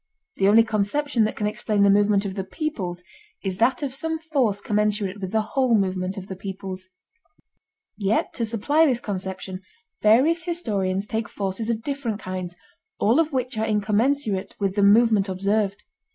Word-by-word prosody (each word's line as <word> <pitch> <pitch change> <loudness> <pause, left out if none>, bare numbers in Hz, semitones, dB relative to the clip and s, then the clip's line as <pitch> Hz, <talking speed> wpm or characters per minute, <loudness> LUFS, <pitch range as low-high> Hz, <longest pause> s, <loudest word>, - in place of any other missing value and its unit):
The 195 - +3
only 220 +3 +7
conception 225 +4 0
that 215 - -2
can 210 - -2
explain 210 0 0
the 200 - +5
movement 205 0 +3
of 195 - -3
the 195 -1 -3
peoples 190 - -4 0.4
is 190 -1 -3
that 255 +5 +2
of 270 -2 -3
some 320 +4 -2
force 275 -11 0
commensurate 210 -1 -1
with 190 -1 -4
the 220 -1 +1
whole 255 -4 +3
movement 185 -1 -1
of 190 - -6
the 190 - -7
peoples. 190 -1 -7 1.1
Yet 205 +2 0
to 235 - -3
supply 285 +9 +2
this 250 -4 +1
conception 190 -2 -5 0.4
various 285 +10 +4
historians 200 - -1
take 220 0 -3
forces 200 +3 -3
of 225 -1 -1
different 270 -7 -3
kinds, 185 -2 -5 0.4
all 225 +9 +3
of 320 -1 +2
which 255 -3 -2
are 220 - +1
incommensurate 215 0 0
with 195 -2 0
the 205 - 0
movement 210 -1 +5
observed. 200 +2 0
210 Hz, 165 wpm, -24 LUFS, 195-240 Hz, 1.1 s, only